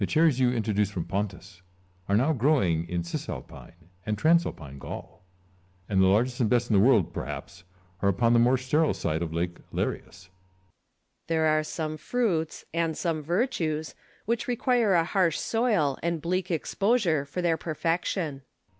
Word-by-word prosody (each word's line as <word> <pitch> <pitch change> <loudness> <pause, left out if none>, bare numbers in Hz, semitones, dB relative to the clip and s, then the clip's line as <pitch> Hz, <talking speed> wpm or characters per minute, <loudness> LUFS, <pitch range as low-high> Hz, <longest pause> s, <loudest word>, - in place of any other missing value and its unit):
The 100 - +1
cherries 155 -4 +3
you 125 -1 +3
introduced 105 -4 0
from 85 -4 -3
Pontus 95 -1 -4 0.5
are 100 - +4
now 140 +8 +3
growing 110 - +1
in 85 -1 -1
Cisalpine 85 0 -8
and 105 +2 -2
Transalpine 105 - +1
Gaul; - - -9 0.6
and 95 -2 +2
the 95 - +5
largest 120 +6 +2
and 115 -4 +2
best 120 -1 +1
in - - +4
the 95 - +6
world, 115 -8 +4
perhaps, 90 -2 -7 0.4
are 100 - +3
upon 115 +5 +2
the 120 - +5
more 125 +2 +4
sterile 150 +5 +1
side 80 0 -2
of 85 -2 -3
Lake 85 +1 -2
Larius. - - -1
Lucullus. 95 +1 -18 1.0
There 160 -1 +1
are 155 0 +3
some 155 0 -4
fruits, 180 -8 -1
and 165 -1 0
some 165 -3 -1
virtues, 160 - -1 0.3
which 235 +2 -1
require 240 -4 +2
a 165 - +4
harsh 175 -2 +1
soil 210 - +1
and 170 0 -1
bleak 180 +3 -2
exposure 180 - +1
for 145 +6 -5
their 165 -2 +2
perfection. 165 -2 -2
145 Hz, 165 wpm, -27 LUFS, 100-170 Hz, 1.0 s, the